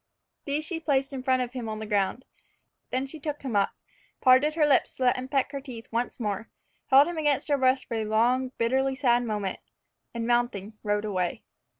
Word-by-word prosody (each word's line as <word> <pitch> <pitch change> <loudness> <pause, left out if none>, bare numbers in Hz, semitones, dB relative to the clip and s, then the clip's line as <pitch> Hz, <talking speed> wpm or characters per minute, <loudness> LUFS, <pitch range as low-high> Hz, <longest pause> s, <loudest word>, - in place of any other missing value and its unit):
These 295 +2 -1
she 330 0 -2
placed 275 -3 0
in 265 - -4
front 255 0 +2
of 245 0 -7
him 240 -4 -4
on 215 - -4
the 215 - -5
ground. 210 +4 0 0.6
Then 260 +1 -1
she 305 +3 -8
took 295 0 -4
him 255 -5 -3
up, 200 -1 +3 0.5
parted 265 +4 +5
her 310 -2 +4
lips 285 -3 +2
to 260 - -3
let 250 - +4
him 255 0 -5
peck 275 0 0
her 280 -1 -5
teeth 245 -4 -8
once 235 +2 -2
more, 210 -1 -3 0.4
held 275 +3 +7
him 345 -2 -3
against 295 -1 +1
her 285 - +3
breast 260 0 +3
for - - -6
a 220 -1 -1
long, 245 +4 +2
bitterly 265 +3 +1
sad 245 -3 +3
moment, 210 -4 -3 0.6
and 230 -1 -2
mounting, 240 -4 0
rode 205 0 0
away. 185 -4 -2
255 Hz, 210 wpm, -27 LUFS, 225-275 Hz, 0.6 s, held